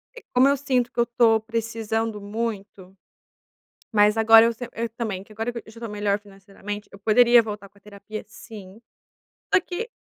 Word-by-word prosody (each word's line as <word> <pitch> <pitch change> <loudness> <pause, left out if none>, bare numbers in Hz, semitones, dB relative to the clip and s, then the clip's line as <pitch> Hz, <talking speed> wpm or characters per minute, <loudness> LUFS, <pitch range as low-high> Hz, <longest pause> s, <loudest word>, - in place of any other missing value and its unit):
é 480 - -10
como 255 +2 +5
eu 280 0 +2
sinto 255 -3 0
que - - -6
eu - - +6
estou 235 -2 +3
precisando 225 -1 -3
muito, 205 -3 -6 1.0
mas 210 +1 +4
agora 225 0 +7
eu 235 - +1
se 240 +1 -8
eu 230 0 -3
também 220 -5 -4
que 215 - -17
agora 225 +3 -3
que 235 - -6
eu - - -9
já 230 - -14
estou 230 -1 -6
melhor 205 -1 -1
financeiramente 205 +1 -9
eu 200 - -12
poderia 235 +3 +5
voltar 210 -2 -7
com 200 - -25
a - - -28
terapia, 210 +1 -9
sim. 210 -1 -12 0.7
Só - - +6
que 420 +7 -6
220 Hz, 190 wpm, -24 LUFS, 205-235 Hz, 1.0 s, agora